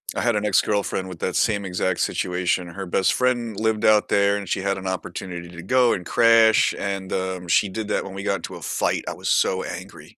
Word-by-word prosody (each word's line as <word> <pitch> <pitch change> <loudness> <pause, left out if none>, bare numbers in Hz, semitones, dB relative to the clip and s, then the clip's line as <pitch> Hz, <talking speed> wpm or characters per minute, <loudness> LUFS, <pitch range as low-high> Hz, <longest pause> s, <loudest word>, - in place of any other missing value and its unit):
I - - -1
had 120 -2 +1
an 105 0 -1
ex-girlfriend 100 -2 +1
with 90 -3 -9
that 90 - -2
same 105 -3 +1
exact 90 0 -1
situation. 90 0 -1
Her 95 +3 -7
best 95 +1 +2
friend 120 -4 0
lived 110 0 0
out 105 -1 +4
there, 100 0 +3
and 100 -3 -7
she 95 - -1
had 100 0 -1
an 95 0 -6
opportunity 90 -2 -5
to 85 -1 -10
go 125 +3 +3
and 90 - -4
crash, 115 0 +5
and, 100 -1 -4
um, 95 -1 -3
she 100 +4 +3
did 110 +2 -5
that - - 0
when 95 - -8
we 100 - -6
got 100 -1 0
into 85 - -8
a - - -10
fight, - - -1
I - - -2
was - - -5
so - - +2
angry, - - -9
100 Hz, 230 wpm, -23 LUFS, 95-110 Hz, -, crash